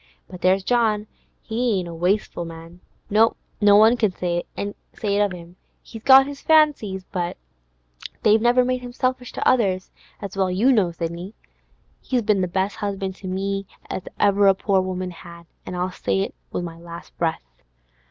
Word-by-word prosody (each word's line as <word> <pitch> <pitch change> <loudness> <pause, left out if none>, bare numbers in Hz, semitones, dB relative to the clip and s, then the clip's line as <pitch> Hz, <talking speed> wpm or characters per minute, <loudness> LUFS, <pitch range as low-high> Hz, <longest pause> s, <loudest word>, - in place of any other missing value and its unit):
But 180 - -11
there's 185 +1 +3
John, 220 -2 +1 0.4
he 230 -1 0
ain't 180 -2 -3
a 170 - -7
wasteful 180 +2 0
man; 165 +1 -10 0.3
no 220 +2 +4 0.3
one 210 +3 +6
can't 215 -6 0
say 175 -1 -1
it 205 0 -3
of 205 -2 +2
him. 175 0 -11 0.3
He's 225 - -10
got 265 +2 +8
his 285 0 -8
fancies, 285 -12 +3
but 175 -2 -3 0.9
they've 215 +1 +5
never 245 +2 +4
made 255 0 -1
him 245 -1 -8
selfish 255 -1 -2
to - - -1
others, 190 -7 +2 0.3
as 200 -2 -7
well 190 -1 +1
you 210 +9 +3
know, 205 -8 +3
Sidney. 170 +4 -6 0.7
He's 250 -3 -1
been 205 -2 +2
the 185 - 0
best 190 +3 -1
'usband 195 -2 -3
to 190 - -9
me 195 +1 -2 0.2
as - - -3 0.2
ever 200 0 +4
a 195 - +6
poor 195 0 +1
woman 185 0 -4
had, 170 -1 -12 0.2
an' 180 - -5
I'll 180 +1 -2
say 95 - -1
it - - -3 0.2
with - - -3
my 165 -1 -7
last 170 0 -11
breath. 165 -1 -1
195 Hz, 175 wpm, -23 LUFS, 180-220 Hz, 0.9 s, got